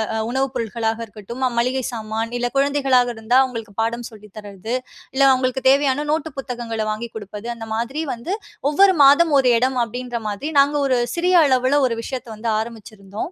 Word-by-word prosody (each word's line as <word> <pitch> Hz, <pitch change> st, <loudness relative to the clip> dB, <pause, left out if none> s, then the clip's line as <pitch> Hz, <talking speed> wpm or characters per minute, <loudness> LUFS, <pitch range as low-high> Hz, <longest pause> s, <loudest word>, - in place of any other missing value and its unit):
அ -, -, -1 dB
உணவு 265 Hz, +1 st, +1 dB
பொருட்களாக 225 Hz, 0 st, -2 dB
இருக்கட்டும், 230 Hz, +5 st, -5 dB
மளிகை 255 Hz, +2 st, 0 dB
சாமான் 225 Hz, 0 st, -4 dB
இல்ல 245 Hz, -, 0 dB
குழந்தைகளாக 270 Hz, -4 st, +2 dB
இருந்தா 230 Hz, +3 st, +2 dB
அவுங்களுக்கு 225 Hz, -5 st, -6 dB
பாடம் 235 Hz, +1 st, -3 dB
சொல்லி 210 Hz, -1 st, -14 dB
தர்றது, 205 Hz, +3 st, -5 dB, 0.4 s
இல்ல 275 Hz, -, +1 dB
அவுங்களுக்கு 260 Hz, 0 st, 0 dB
தேவையான 280 Hz, 0 st, +2 dB
நோட்டு 320 Hz, +1 st, -1 dB
புத்தகங்கள 240 Hz, -4 st, -4 dB
வாங்கி 215 Hz, +2 st, -3 dB
குடுப்பது. 210 Hz, +1 st, -8 dB
அந்த 225 Hz, -1 st, -8 dB
மாதிரி 240 Hz, +7 st, -2 dB
வந்து 240 Hz, +10 st, -6 dB, 0.4 s
ஒவ்வொரு 380 Hz, +6 st, +5 dB
மாதம் 295 Hz, +4 st, +6 dB
ஒரு 265 Hz, -, +3 dB
இடம் 255 Hz, +1 st, 0 dB
அப்டீன்ற 245 Hz, +1 st, -5 dB
மாதிரி 240 Hz, +10 st, -4 dB
நாங்க 285 Hz, +1 st, +4 dB
ஒரு 255 Hz, -, +2 dB, 0.2 s
சிறிய 360 Hz, +1 st, +2 dB
அளவுல 260 Hz, +1 st, +3 dB
ஒரு 230 Hz, -2 st, 0 dB
விஷயத்த 255 Hz, 0 st, -6 dB
வந்து 225 Hz, +2 st, -3 dB
ஆரம்பிச்சுருந்தோம். 215 Hz, -, -7 dB
245 Hz, 165 wpm, -21 LUFS, 225-270 Hz, 0.4 s, மாதம்